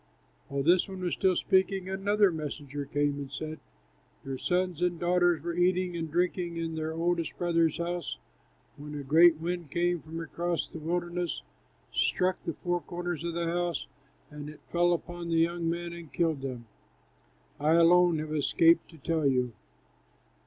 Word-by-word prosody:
While 140 0 -2
this 175 +4 +4
one 190 -1 -7
was 180 -1 -1
still 190 -2 +2
speaking, 190 0 +2
another 200 +1 +2
messenger 145 -2 -5
came 145 0 0
and 140 -1 -6
said, 155 0 -5 0.7
"Your 135 -1 -4
sons 180 -2 0
and 175 -1 +1
daughters 175 -1 +2
were 170 0 -2
eating 180 0 +1
and 165 -1 -3
drinking 175 +1 0
in 165 -1 -2
their 160 0 -2
oldest 165 0 -1
brother's 165 -3 +2
house 170 - -3 0.6
when 150 +1 -8
a 145 - -4
great 160 +4 +6
wind 170 -1 -3
came 175 +1 0
from 160 +1 -7
across 170 +1 -2
the 165 - -9
wilderness, 175 +1 -2 0.5
struck 185 0 +1
the 165 - -2
four 175 -1 -1
corners 175 -2 -4
of 170 -1 -3
the 170 0 -1
house, 175 0 -1 0.5
and 150 0 -7
it 150 - -12
fell 175 0 +3
upon 175 0 -3
the 165 - +1
young 165 0 +1
men 170 0 -3
and 170 -3 -10
killed 160 -5 0
them. 125 -3 -5 0.9
I 150 +2 +3
alone 170 0 +6
have 155 0 -4
escaped 165 +3 +4
to 165 - -14
tell 160 0 0
you." 125 -3 +1
170 Hz, 165 wpm, -29 LUFS, 155-175 Hz, 0.9 s, great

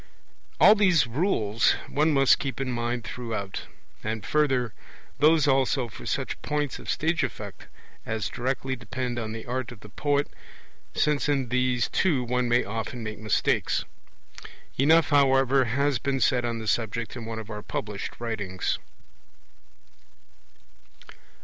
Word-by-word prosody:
All 210 - +9
these 185 -9 +4
rules 115 - +2
one 155 +2 +2
must 135 -2 +5
keep 135 -4 -4
in 135 -2 -1
mind 120 0 -2
throughout, 110 -6 -5 0.4
and 110 -1 -3
further, 135 -6 +1 0.5
those 155 0 +5
also 135 -2 +2
for - - -10
such - - -2
points 145 -3 -2
of - - -9
stage 160 +1 +1
effect - - -6 0.4
as 110 -1 -2
directly 130 +1 -2
depend 120 +1 -4
on 110 -2 -4
the 110 0 -6
art 125 0 -3
of 115 -4 -12
the 105 - -12
poet, 145 +5 0 0.7
since 150 -1 +1
in 135 -4 +1
these 125 -1 +1
too 155 -9 +1
one 125 0 0
may 120 +1 +3
often 115 +3 -4
make 110 0 -5
mistakes. 110 -2 +1 0.9
Enough, 160 +4 +4
however, 135 -2 +4
has 140 +2 +1
been 135 +2 -1
said 125 -2 +2
on 120 -1 -2
the 110 - -6
subject 115 +3 -1
in 120 -3 -6
one 115 0 -5
of 110 0 -7
our 105 -1 -5
published 105 -1 -5
writings. 105 -6 -2
125 Hz, 145 wpm, -26 LUFS, 115-140 Hz, 0.9 s, All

